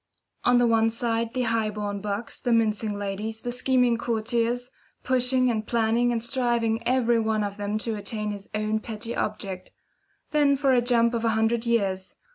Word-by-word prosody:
On 245 Hz, 0 st, +5 dB
the 245 Hz, -, +4 dB
one 225 Hz, -1 st, +3 dB
side, 230 Hz, 0 st, -1 dB
the 255 Hz, 0 st, -1 dB
high 225 Hz, -2 st, +1 dB
born 205 Hz, -1 st, -4 dB
bucks, 210 Hz, +2 st, -4 dB
the 245 Hz, -, -1 dB
mincing 215 Hz, -2 st, +1 dB
ladies, 205 Hz, +2 st, -4 dB
the 245 Hz, -, -3 dB
scheming 250 Hz, -1 st, +2 dB
courtiers, 235 Hz, +2 st, -1 dB, 0.3 s
pushing 255 Hz, 0 st, +2 dB
and 215 Hz, -2 st, -3 dB
planning, 235 Hz, +1 st, +2 dB
and 230 Hz, -1 st, -1 dB
striving 235 Hz, -3 st, 0 dB
every 240 Hz, -2 st, +3 dB
one 220 Hz, -1 st, 0 dB
of 200 Hz, 0 st, -4 dB
them 205 Hz, +1 st, -2 dB
to 220 Hz, 0 st, -2 dB
attain 210 Hz, +1 st, -4 dB
his 200 Hz, -1 st, -8 dB
own 215 Hz, +1 st, 0 dB
petty 225 Hz, +1 st, -6 dB
object. 195 Hz, -3 st, -4 dB, 0.6 s
Then 290 Hz, -2 st, +3 dB
for 270 Hz, -1 st, +2 dB
a 245 Hz, -, +4 dB
jump 235 Hz, -1 st, +3 dB
of 230 Hz, -1 st, -1 dB
a 230 Hz, -, +2 dB
hundred 225 Hz, +1 st, +1 dB
years. 195 Hz, -5 st, 0 dB
230 Hz, 180 wpm, -26 LUFS, 215-240 Hz, 0.6 s, On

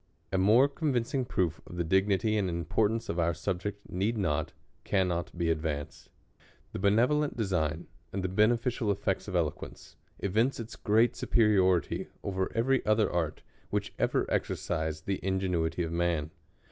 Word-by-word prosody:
A 95 Hz, -, +1 dB
more 110 Hz, +8 st, +6 dB
convincing 135 Hz, -4 st, -1 dB
proof 85 Hz, -8 st, -1 dB
of 90 Hz, -, -9 dB
the 85 Hz, -, +1 dB
dignity 95 Hz, +4 st, +2 dB
and 100 Hz, -3 st, +1 dB
importance 105 Hz, +7 st, 0 dB
of 85 Hz, -, -2 dB
our 85 Hz, -1 st, +1 dB
subject 100 Hz, +4 st, -4 dB
need 100 Hz, +6 st, -1 dB
not, 80 Hz, -6 st, 0 dB, 0.3 s
cannot 90 Hz, -3 st, 0 dB
be 85 Hz, -1 st, +1 dB
advanced. 75 Hz, -2 st, -4 dB, 0.6 s
The -, -, -5 dB
benevolent 125 Hz, +9 st, +2 dB
design 85 Hz, -7 st, -1 dB, 0.3 s
and 95 Hz, -1 st, -3 dB
the -, -, +1 dB
beneficial 115 Hz, +3 st, +1 dB
effects 100 Hz, -, -1 dB
of -, -, -4 dB
eloquence, -, -, -3 dB, 0.2 s
evince 110 Hz, +8 st, +1 dB
its 115 Hz, -1 st, -7 dB
great 110 Hz, +3 st, +2 dB
superiority 95 Hz, -6 st, +2 dB, 0.2 s
over 95 Hz, -1 st, -2 dB
every 130 Hz, +3 st, +2 dB
other 110 Hz, 0 st, +3 dB
■Avt, 85 Hz, -3 st, -2 dB, 0.3 s
which -, -, -2 dB
ever -, -, +1 dB
exercised 80 Hz, +1 st, -2 dB
the 95 Hz, -1 st, -1 dB
ingenuity 90 Hz, -3 st, 0 dB
of 80 Hz, -, -4 dB
man. 85 Hz, -3 st, 0 dB
95 Hz, 145 wpm, -30 LUFS, 85-110 Hz, 0.6 s, more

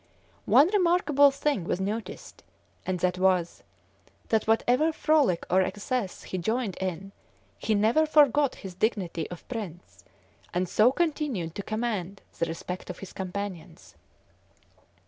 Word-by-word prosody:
One 290 Hz, -, +6 dB
remarkable 340 Hz, -7 st, +4 dB
thing 280 Hz, -, -1 dB
was 175 Hz, -, -2 dB
noticed, 210 Hz, +4 st, -5 dB, 0.4 s
and 185 Hz, -1 st, -1 dB
that 180 Hz, 0 st, 0 dB
was, 185 Hz, -2 st, +1 dB, 0.7 s
that 220 Hz, -1 st, +1 dB
whatever 245 Hz, +7 st, +3 dB
frolic 305 Hz, -, +2 dB
or 185 Hz, +2 st, +3 dB
excess 200 Hz, +3 st, -3 dB
he 185 Hz, -, -4 dB
joined 220 Hz, +1 st, -1 dB
in 190 Hz, +1 st, -4 dB, 0.5 s
he 220 Hz, -, 0 dB
never 225 Hz, +10 st, +3 dB
forgot 290 Hz, -2 st, +4 dB
his 190 Hz, -3 st, -9 dB
dignity 180 Hz, -5 st, -1 dB
of 175 Hz, -, -10 dB
prince, 200 Hz, -8 st, -8 dB, 0.5 s
and 180 Hz, +1 st, +1 dB
so 215 Hz, +7 st, +4 dB
continued 285 Hz, -, -1 dB
to 200 Hz, -, -5 dB
command 205 Hz, -3 st, -3 dB, 0.2 s
the 170 Hz, -, +1 dB
respect 180 Hz, +2 st, -6 dB
of 180 Hz, -, -6 dB
his 195 Hz, -, -10 dB
companions. 185 Hz, -3 st, -6 dB
205 Hz, 130 wpm, -27 LUFS, 180-260 Hz, 0.7 s, One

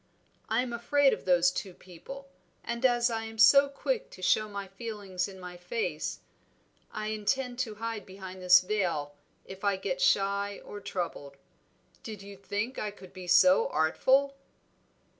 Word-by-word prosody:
I 225 Hz, +3 st, +2 dB
am 245 Hz, -2 st, -5 dB
afraid 270 Hz, +4 st, +3 dB
of -, -, -6 dB
those 180 Hz, -1 st, +4 dB
two 185 Hz, -1 st, -5 dB
people; 270 Hz, +11 st, -11 dB, 0.4 s
and 235 Hz, +1 st, -4 dB
as 240 Hz, -1 st, +2 dB
I 225 Hz, -1 st, -2 dB
am 225 Hz, 0 st, -9 dB
so 275 Hz, +5 st, +7 dB
quick -, -, -2 dB
to 185 Hz, -, -12 dB
show 215 Hz, +3 st, +2 dB
my 200 Hz, -1 st, -6 dB
feelings 195 Hz, -3 st, -4 dB
in 190 Hz, -1 st, -11 dB
my 180 Hz, -1 st, -9 dB
face, 175 Hz, -3 st, -3 dB, 0.7 s
I 215 Hz, 0 st, -4 dB
intend 245 Hz, +4 st, -1 dB
to 225 Hz, -5 st, -2 dB
hide 225 Hz, -1 st, -5 dB
behind 190 Hz, -1 st, -9 dB
this 180 Hz, 0 st, +7 dB
veil 180 Hz, -7 st, -1 dB, 0.3 s
if 190 Hz, +1 st, -11 dB
I 200 Hz, -1 st, +2 dB
get 185 Hz, -1 st, -3 dB
shy 200 Hz, +2 st, +2 dB
or 205 Hz, -, -8 dB
troubled. 170 Hz, -8 st, -5 dB, 0.6 s
Did 215 Hz, -3 st, -8 dB
you 200 Hz, 0 st, -10 dB
think 205 Hz, +5 st, -4 dB
I 210 Hz, -, -2 dB
could 190 Hz, -3 st, -14 dB
be 185 Hz, -1 st, -9 dB
so 185 Hz, +1 st, +6 dB
artful?" 265 Hz, -, +2 dB
200 Hz, 160 wpm, -29 LUFS, 185-230 Hz, 0.7 s, so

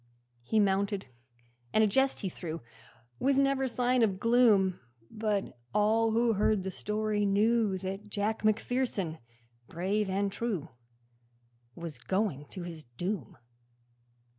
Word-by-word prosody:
He 215 Hz, -, +1 dB
mounted, 200 Hz, 0 st, +1 dB, 0.7 s
and 220 Hz, -, +4 dB
a -, -, +5 dB
jest 265 Hz, +6 st, +1 dB
he 195 Hz, -, -2 dB
threw, 165 Hz, -2 st, -6 dB, 0.6 s
With 270 Hz, +1 st, +2 dB
never 275 Hz, -1 st, +2 dB
sign 250 Hz, 0 st, +1 dB
of 200 Hz, -4 st, +2 dB
gloom; 220 Hz, -5 st, +4 dB, 0.3 s
But 210 Hz, -2 st, -1 dB, 0.2 s
all 220 Hz, +2 st, +3 dB
who 230 Hz, 0 st, +3 dB
heard 210 Hz, -1 st, +2 dB
the 190 Hz, -, -3 dB
story 210 Hz, +1 st, -1 dB
knew 210 Hz, 0 st, +2 dB
That 195 Hz, +2 st, -5 dB
Jack 210 Hz, +2 st, -1 dB
Macpherson, 215 Hz, -6 st, 0 dB, 0.5 s
brave 195 Hz, +4 st, -1 dB
and 195 Hz, +1 st, 0 dB
true, 195 Hz, -8 st, -3 dB, 1.1 s
Was 165 Hz, -7 st, -7 dB
going 185 Hz, -, -1 dB
to 185 Hz, -, -7 dB
his 170 Hz, -2 st, -7 dB
doom. 150 Hz, -, -5 dB
205 Hz, 125 wpm, -30 LUFS, 190-225 Hz, 1.1 s, a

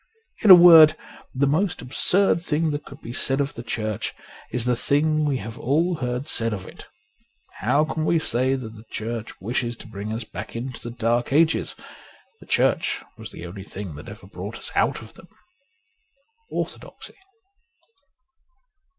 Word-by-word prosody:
In 215 Hz, -, +3 dB
a 185 Hz, -, +14 dB
word, 165 Hz, -3 st, +8 dB, 0.3 s
the 135 Hz, +2 st, +1 dB
most 160 Hz, +5 st, 0 dB
absurd 170 Hz, +8 st, +3 dB
thing 160 Hz, -1 st, 0 dB
that 145 Hz, 0 st, -4 dB
could 140 Hz, +2 st, -12 dB
be 115 Hz, -, -7 dB
said 135 Hz, +2 st, +1 dB
of 140 Hz, 0 st, -1 dB
the 115 Hz, -, -7 dB
Church 110 Hz, -3 st, -3 dB, 0.4 s
is 120 Hz, -1 st, -3 dB
the 125 Hz, -1 st, +2 dB
thing 155 Hz, +4 st, +1 dB
we 140 Hz, -3 st, 0 dB
have 110 Hz, -1 st, -8 dB
all 165 Hz, +6 st, +1 dB
heard 125 Hz, +1 st, -3 dB
said 115 Hz, -6 st, +1 dB
of 95 Hz, -2 st, -6 dB
it. -, -, -12 dB, 0.7 s
How 150 Hz, +2 st, +2 dB
can 155 Hz, 0 st, -3 dB
we 170 Hz, -, +3 dB
say 130 Hz, -3 st, +1 dB
that 115 Hz, -4 st, -7 dB
the 110 Hz, 0 st, -14 dB
Church 115 Hz, 0 st, -5 dB
wishes 120 Hz, +3 st, -2 dB
to -, -, -12 dB
bring 105 Hz, 0 st, -6 dB
us 115 Hz, +2 st, -3 dB
back 110 Hz, -, -9 dB
into 125 Hz, +1 st, -5 dB
the 120 Hz, -, -6 dB
Dark 120 Hz, +1 st, -1 dB
Ages? 160 Hz, +3 st, +2 dB, 0.6 s
The -, -, -16 dB
Church -, -, +1 dB
was -, -, -9 dB
the 85 Hz, -, -10 dB
only 90 Hz, +3 st, -8 dB
thing 95 Hz, -2 st, -8 dB
that 75 Hz, -, -10 dB
ever -, -, -11 dB
brought -, -, -8 dB
us -, -, -7 dB
out -, -, +1 dB
of 110 Hz, -, -14 dB
them. 180 Hz, -, -16 dB, 0.7 s
' 455 Hz, +1 st, -45 dB
Orthodoxy.' -, -, -6 dB
130 Hz, 175 wpm, -23 LUFS, 115-155 Hz, 0.7 s, a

